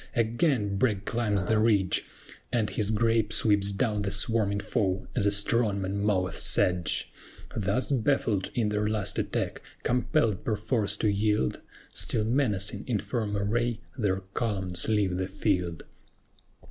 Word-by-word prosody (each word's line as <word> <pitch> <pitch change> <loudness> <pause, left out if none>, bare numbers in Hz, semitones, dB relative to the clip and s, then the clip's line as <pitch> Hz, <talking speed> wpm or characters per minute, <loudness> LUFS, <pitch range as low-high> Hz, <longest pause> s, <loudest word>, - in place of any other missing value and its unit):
Again 115 - +1
BRAGG 100 -3 +1
climbs 105 -4 0
the 110 +4 +1
ridge, 105 -4 +2 0.5
And 115 -3 0
his 105 -2 -1
grape 115 0 +1
sweeps 100 -3 +4
down 105 0 0
the 100 - -1
swarming 100 0 +1
foe, 95 -4 -1
as 105 -5 +2
a - - +3
strong 105 0 +2
man 95 +1 -2
moweth 95 -3 0
sedge: 90 -4 +1 0.4
Thus 105 +7 -1
baffled 115 -6 +1
in 115 -4 +1
their 105 0 0
last 105 -2 0
attack, - - -2 0.2
compelled 120 - +1
perforce 105 -1 +1
to 110 - 0
yield, 105 - +1 0.3
Still 105 - +2
menacing 110 -5 0
in 120 -4 +1
firm 105 -2 -2
array, 115 +3 0 0.2
their 100 -6 0
columns 95 -6 -1
leave 100 -4 +1
the 95 - -1
field. 90 -4 -1
105 Hz, 140 wpm, -28 LUFS, 100-115 Hz, 0.5 s, sweeps